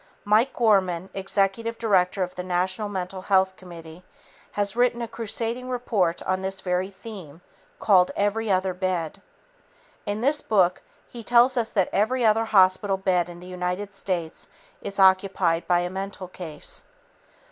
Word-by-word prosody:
Mike 215 Hz, +5 st, +3 dB
Gorman, 190 Hz, -6 st, +1 dB
executive 195 Hz, +4 st, -1 dB
director 190 Hz, -3 st, +2 dB
of 180 Hz, -, -5 dB
the 180 Hz, -, -5 dB
National 185 Hz, +3 st, -1 dB
Mental 185 Hz, -1 st, -5 dB
Health 190 Hz, -1 st, +2 dB
Committee, 170 Hz, -2 st, -12 dB, 0.5 s
has 205 Hz, 0 st, -1 dB
written 245 Hz, 0 st, +2 dB
a 235 Hz, -, -3 dB
crusading 230 Hz, +2 st, -3 dB
report 220 Hz, -9 st, 0 dB
on 185 Hz, 0 st, -1 dB
this 190 Hz, 0 st, -3 dB
very 180 Hz, +1 st, -1 dB
theme 190 Hz, -6 st, -11 dB, 0.4 s
called 185 Hz, -4 st, +4 dB
Every 210 Hz, +2 st, 0 dB
Other 185 Hz, -1 st, +1 dB
Bed. 180 Hz, -4 st, -3 dB, 0.9 s
In 205 Hz, +1 st, -2 dB
this 290 Hz, +4 st, +2 dB
book 185 Hz, -4 st, +2 dB, 0.3 s
he 235 Hz, -1 st, -10 dB
tells 245 Hz, +3 st, +4 dB
us 235 Hz, -3 st, 0 dB
that 190 Hz, -4 st, +2 dB
every 240 Hz, +4 st, +1 dB
other 225 Hz, +1 st, +3 dB
hospital 195 Hz, -1 st, +3 dB
bed 180 Hz, -2 st, +1 dB
in 175 Hz, 0 st, -11 dB
the -, -, -11 dB
United 180 Hz, +2 st, -4 dB
States 180 Hz, -4 st, -3 dB, 0.3 s
is 200 Hz, 0 st, -5 dB
occupied 190 Hz, -3 st, +3 dB
by 175 Hz, -1 st, +3 dB
a 175 Hz, -, -2 dB
mental 195 Hz, 0 st, -5 dB
case. 165 Hz, -4 st, -7 dB
190 Hz, 150 wpm, -25 LUFS, 180-215 Hz, 0.9 s, called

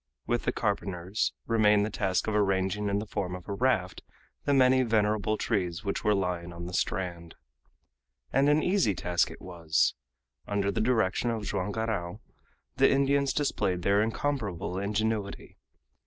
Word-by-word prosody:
With 120 Hz, 0 st, -1 dB
the -, -, +2 dB
carpenters 100 Hz, -2 st, -1 dB
remained 105 Hz, -2 st, +4 dB
the 110 Hz, -, -4 dB
task 95 Hz, -2 st, 0 dB
of 110 Hz, -, -2 dB
arranging 100 Hz, 0 st, +1 dB
in 100 Hz, -, +1 dB
the 105 Hz, -, -3 dB
form 95 Hz, -4 st, -3 dB
of 90 Hz, -, -10 dB
a 100 Hz, -, -3 dB
raft 110 Hz, -5 st, 0 dB, 0.4 s
the -, -, +1 dB
many 130 Hz, 0 st, +5 dB
venerable 110 Hz, -2 st, +1 dB
trees 90 Hz, -6 st, -1 dB
which 100 Hz, -1 st, -2 dB
were 105 Hz, -2 st, +3 dB
lying 90 Hz, -2 st, -2 dB
on 85 Hz, 0 st, -7 dB
the 90 Hz, -, -7 dB
strand. 85 Hz, -2 st, -2 dB, 1.0 s
And 140 Hz, +2 st, +4 dB
an 150 Hz, +1 st, +3 dB
easy 180 Hz, -, +2 dB
task 85 Hz, 0 st, +1 dB
it -, -, -11 dB
was. 85 Hz, -3 st, +1 dB, 0.5 s
Under 100 Hz, -1 st, 0 dB
the -, -, -1 dB
direction 115 Hz, -1 st, +1 dB
of 115 Hz, -2 st, -2 dB
Joam 100 Hz, 0 st, -2 dB
Garral 105 Hz, -3 st, -3 dB, 0.6 s
the -, -, +5 dB
Indians 140 Hz, 0 st, +2 dB
displayed 95 Hz, -12 st, -1 dB
their 100 Hz, +2 st, +3 dB
incomparable 110 Hz, -, -2 dB
ingenuity. 105 Hz, 0 st, -2 dB
105 Hz, 155 wpm, -28 LUFS, 90-115 Hz, 1.0 s, many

